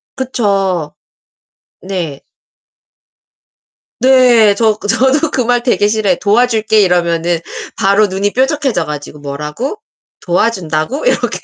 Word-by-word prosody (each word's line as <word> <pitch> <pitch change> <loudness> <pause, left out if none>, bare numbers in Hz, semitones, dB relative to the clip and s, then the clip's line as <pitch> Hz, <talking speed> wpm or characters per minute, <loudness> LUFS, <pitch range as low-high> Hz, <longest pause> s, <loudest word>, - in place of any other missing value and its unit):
그쵸. 195 - -1 0.9
네. 175 -7 -5 1.8
네. 245 -5 +5
저 220 -2 +1
그 205 - -7
저도 265 +8 +1
그 255 - 0
말 245 0 0
되게 205 -5 +2
싫어해요. 210 -4 0
"도와줄게." 220 0 +2
이러면은 170 -2 +1 0.4
바로 200 +2 +3
눈이 195 +2 -2
뾰족해져 265 - 0
가지고 150 0 -7
"뭐라고? 150 - -5 0.4
도와준다고?" 180 - -1
이렇게. - - 0
205 Hz, 240 characters per minute, -14 LUFS, 175-245 Hz, 1.8 s, 네